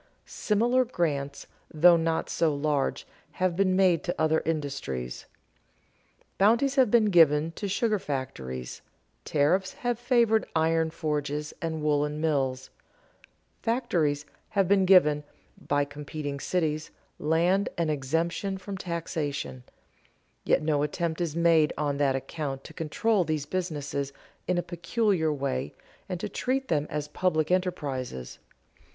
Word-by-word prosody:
Similar 240 +5 +1
grants, 145 - -2 0.3
though 170 +3 +6
not 165 -1 0
so 160 -3 +1
large, 145 -1 -1 0.3
have 185 -2 0
been 185 0 +2
made 185 -4 +3
to 175 - -1
other 160 0 +2
industries. 140 - -3 1.1
Bounties 235 +7 +4
have 265 -5 +4
been 215 -2 +4
given 160 -2 +5
to 200 +5 -5
sugar 210 +1 +1
factories; 65 - -5 0.4
tariffs 180 +6 +1
have 245 -1 -2
favored 235 -3 +3
iron 160 0 +2
forges 150 -2 -3
and 160 -2 -3
woolen 150 0 +1
mills; 135 -4 -1 0.9
factories 170 - 0 0.2
have 195 -3 +1
been 195 0 +4
given, 150 -6 +5 0.4
by 145 0 +2
competing 145 0 -6
cities, 155 -2 -1 0.3
land 175 +6 +2
and 165 -2 +1
exemption 165 +7 -1
from 190 0 -7
taxation; 160 -7 -3 0.8
yet - - +2
no 150 -2 +1
attempt 160 +3 -2
is 165 -3 -2
made 165 -2 +4
on 145 -1 -1
that 140 -2 +2
account 135 0 -4
to - - -11
control 190 +6 +1
these 155 -3 -2
businesses 145 -5 -3 0.3
in 180 - +1
a 175 - 0
peculiar 175 -1 0
way 75 - -3 0.3
and 180 -2 -3
to - - -3
treat 265 +1 -2
them 150 -2 +1
as 150 0 -3
public 155 0 0
enterprises. 140 - -2
160 Hz, 130 wpm, -27 LUFS, 145-185 Hz, 1.1 s, though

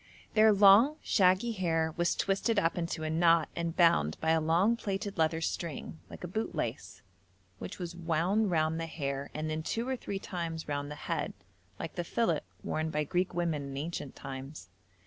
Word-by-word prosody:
Their 220 0 +6
long 205 +8 +7
shaggy 190 +3 +3
hair 165 -6 0
was 175 0 +1
twisted 200 +3 0
up 165 -4 +2
into 170 -2 -3
a 155 - -1
knot 165 0 +4
and 170 -1 -3
bound 80 - +4
by 160 - +1
a 160 0 +3
long 170 +9 +3
plaited 200 -2 -3
leather 160 0 +2
string 160 -1 -4
like - - -10
a - - -3
bootlace, 220 +6 -4 0.6
which 90 - -7
was 175 -1 -6
wound 175 +5 +1
round 160 -1 +1
the 165 - -3
hair 140 -3 -4
and 155 +1 -2
then 155 0 -2
two 230 +9 -2
or 260 - 0
three 205 -5 -5
times 170 -4 -5
round 145 -1 -3
the 150 - -6
head, - - -2 0.4
like - - -6
the - - -3
fillet - - +1 0.2
worn 155 0 -1
by 150 -1 0
Greek 180 +4 -1
women 170 -4 0
in 140 -1 -6
ancient 145 -2 -5
times. 135 -3 -8
165 Hz, 185 wpm, -31 LUFS, 155-190 Hz, 0.6 s, long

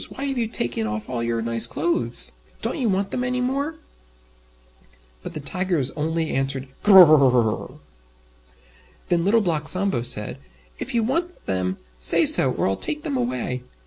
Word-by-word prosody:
why 270 - -7
have 275 -2 -2
you 230 - 0
taken 120 - -2
off 105 0 -5
all 125 -2 -4
your 115 -1 -2
nice 115 0 +1
clothes? 340 -1 0 0.3
Don't - - -2
you 240 -4 0
want 195 +1 -1
them 250 - -2
any 250 0 -1
more?" 275 +5 -2 1.5
But - - -9
the - - -3
Tigers 165 -1 -1
only 160 +1 -2
answered 135 0 -2
"Gr 205 -2 +6
r 185 - +11
r 145 -5 +5
rrrrr!" 115 -4 -1 1.3
Then 170 -1 +1
Little 215 +5 +3
Black 160 -6 -1
Sambo 185 -8 +2
said, 105 -3 -1 0.4
"If - - -5
you 230 - +2
want 335 +9 -3
them, 95 0 -2 0.2
say - - +5
so, - - +5
or - - -1
I'll 95 0 -1
take 150 0 +1
them 140 - -3
away." 125 0 -3
155 Hz, 175 wpm, -22 LUFS, -, 1.5 s, r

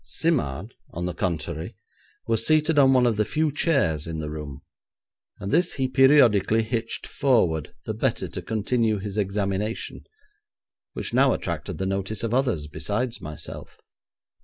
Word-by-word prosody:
Simard, 105 - -1 0.2
on 85 +1 -5
the 90 - -2
contrary, 85 -2 -3 0.5
was 115 -1 +1
seated 155 +2 +3
on 135 -1 +6
one 130 -2 +4
of 115 -3 +2
the 105 - +3
few 155 +7 0
chairs 130 - +1
in 80 -1 -4
the 75 -1 -4
room, 75 -2 -7 0.8
and 100 +1 -4
this 175 +2 +3
he 130 -1 0
periodically 125 -6 +5
hitched 115 0 -3
forward, 90 - +1
the - - -2
better - - -1
to - - -6
continue 110 0 0
his 100 +1 -4
examination, 100 +2 -2 0.9
which - - -5
now - - +4
attracted - - -4
the 95 - -2
notice 100 +3 -2
of 115 0 -1
others 120 - +1
besides 105 +11 -3
myself. 75 0 -7
110 Hz, 150 wpm, -25 LUFS, 90-130 Hz, 0.9 s, on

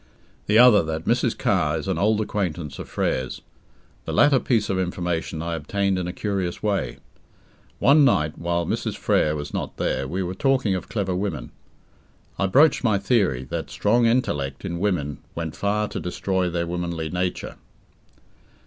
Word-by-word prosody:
The 105 - +4
other 120 -4 +8
that 80 -1 -4
Mrs. - - +1
Carr 75 +2 +1
is 80 - -5
an 95 -4 -1
old 110 +3 +2
acquaintance 90 -8 -3
of - - -7
Frere's. 65 0 -2 0.6
The - - -4
latter 145 -2 +5
piece 115 -5 +1
of 95 -1 -1
information 85 -3 -2
I 85 0 -3
obtained 95 +5 -1
in 90 - -3
a - - -2
curious 95 -2 -3
way. 105 -2 -1 0.8
One 145 +1 +5
night, 75 - +2
while 85 0 -1
Mrs. - - -2
Frere 75 0 +2
was 75 -1 -6
not - - -4
there, 65 +1 -1
we 95 +6 -2
were 90 +1 -3
talking 130 0 +1
of 95 - -4
clever 95 -4 -1
women. 90 -10 -3 0.9
I 100 - +2
broached 140 +10 +4
my 110 -4 +3
theory, 95 - +1
that - - -3
strong 115 +3 +2
intellect 75 - -1
in 85 -2 -3
women 85 -8 -1 0.2
went 80 -2 -4
far 105 +1 0
to - - -4
destroy 90 +1 -1
their 85 0 -1
womanly 85 -2 -3
nature. 90 0 -3
90 Hz, 165 wpm, -24 LUFS, 80-105 Hz, 0.9 s, other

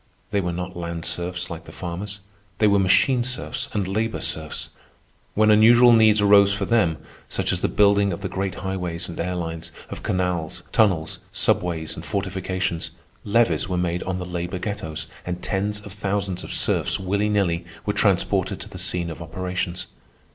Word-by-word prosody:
They 100 -1 +2
were 90 -1 -1
not 90 +2 -5
land 85 -1 -4
serfs 90 +1 -3
like 85 0 -7
the - - -11
farmers. 95 +4 -6 0.4
They 110 - +3
were 100 -1 +5
machine 120 +6 +4
serfs 130 +2 -3
and 100 -5 -1
labor 110 +3 -1
serfs. 80 -1 -3 0.6
When 110 +1 +5
unusual 120 +3 +7
needs 110 -2 +6
arose 100 0 +6
for 100 0 -1
them, 100 -9 +2 0.3
such - - 0
as - - -2
the - - +2
building 100 -1 +4
of 85 - -5
the 95 - -2
great 95 0 -3
highways 90 -3 -2
and 85 - -8
air 90 +2 -1
lines, 80 -1 -4 0.2
of - - -6
canals, 90 -4 -1
tunnels, 90 -8 +2
subways, 80 -3 0
and - - -8
fortifications, 95 -3 -2 0.3
levies 115 0 +2
were 90 - -1
made 90 0 0
on 95 0 -2
the 90 - -4
labor 90 +1 -3
ghettos, 90 -6 -4 0.2
and 90 0 -5
tens 105 +2 -1
of 100 -2 -10
thousands 100 -2 -2
of - - -7
serfs, - - +1
willy 100 +3 0
nilly, 90 -5 +1 0.2
were - - 0
transported - - +1
to - - -8
the - - -8
scene 85 -2 0
of 80 - -8
operations. 90 +2 -3
95 Hz, 175 wpm, -23 LUFS, 85-100 Hz, 0.6 s, unusual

